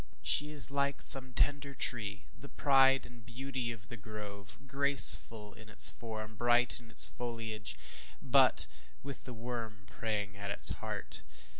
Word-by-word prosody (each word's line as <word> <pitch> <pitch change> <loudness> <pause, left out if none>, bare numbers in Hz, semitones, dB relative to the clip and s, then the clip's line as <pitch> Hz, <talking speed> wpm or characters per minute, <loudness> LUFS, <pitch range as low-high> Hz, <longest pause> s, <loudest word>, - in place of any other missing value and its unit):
She 145 - +1
is 145 -3 -1
like 140 0 -4
some 130 -1 +6
tender 140 +2 -3
tree, 105 -5 -6
the 140 - -16
pride 135 -1 0
and 120 -1 -17
beauty 125 +1 -8
of 110 -1 -13
the 120 - -12
grove; 100 -1 -12
graceful 135 -6 0
in 110 -1 -18
its 110 - +1
form, 110 -2 -11
bright 120 +3 -1
in 120 -1 -20
its - - +12
foliage, 115 -3 -8 0.4
but - - +1 0.4
with 140 0 -11
the 125 - -10
worm 115 -3 -9
preying 105 -1 -7
at 100 0 -10
its 100 - +1
heart. - - -9
115 Hz, 150 wpm, -30 LUFS, 110-135 Hz, 0.4 s, its